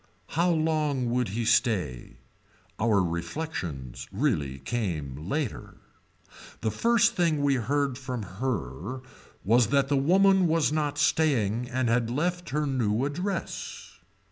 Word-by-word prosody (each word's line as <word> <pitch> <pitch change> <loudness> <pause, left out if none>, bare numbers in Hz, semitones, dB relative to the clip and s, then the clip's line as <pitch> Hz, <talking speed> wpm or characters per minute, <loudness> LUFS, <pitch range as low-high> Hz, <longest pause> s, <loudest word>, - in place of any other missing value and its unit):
How 170 +3 +1
long 155 -6 +1
would 125 0 +1
he 110 +4 -3
stay. 110 - +1 0.6
Our 105 -3 +3
reflections 85 - -4
really 70 -3 0
came 75 - -4
later. 145 -3 -3 0.9
The 110 - 0
first 230 - +3
thing 165 -5 +1
we 140 -1 +3
heard 135 +2 0
from 130 -4 -4
her 100 - -4 0.4
was 115 +3 +4
that 140 -1 +2
the 140 - +2
woman 190 +5 +4
was 160 -2 +2
not 150 -2 -1
staying 125 -7 +1
and 130 0 0
had 115 0 +1
left 175 +7 -1
her 150 +2 0
new 125 -3 0
address. 180 +7 -4
125 Hz, 125 wpm, -27 LUFS, 105-150 Hz, 0.9 s, was